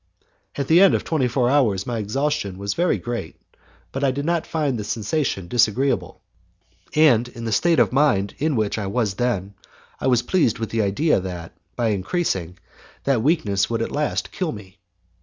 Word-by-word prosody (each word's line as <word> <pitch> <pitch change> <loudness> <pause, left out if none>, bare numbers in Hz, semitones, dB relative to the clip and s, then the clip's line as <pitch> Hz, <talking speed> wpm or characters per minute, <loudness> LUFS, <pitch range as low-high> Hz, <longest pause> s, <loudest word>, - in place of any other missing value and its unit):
At 140 -1 -2
the 165 +3 +6
end 195 - +6
of - - -1
twenty 150 -6 0
four 125 0 +1
hours, 120 -9 +2
my 120 -2 -3
exhaustion 110 -2 -2
was 100 +1 -2
very 175 +1 +1
great, 120 -1 -5 0.6
but 135 - -4
I 140 - +4
did 140 +2 -3
not 170 0 0
find 150 -5 -1
the - - -3
sensation 105 - -2
disagreeable, 120 +5 +1 0.7
and, 130 -7 +5
in 120 -2 -9
the 115 - -2
state 165 +10 +3
of - - +3
mind 115 -9 +2
in 155 -1 +1
which 110 -1 0
I 100 - -3
was 105 -1 0
then, 100 -3 -2 0.5
I - - -1
was 125 -2 +3
pleased 155 - +1
with 115 -2 -4
the 115 - +1
idea 105 +8 +2
that, 90 -3 -7 0.2
by 120 -2 0
increasing, 95 - -2 0.5
that 135 -5 +1
weakness 110 - +1
would 115 -1 -1
at - - -4
last 150 0 -2
kill 180 -4 -2
me. 95 -3 -11
120 Hz, 185 wpm, -22 LUFS, 100-145 Hz, 0.7 s, the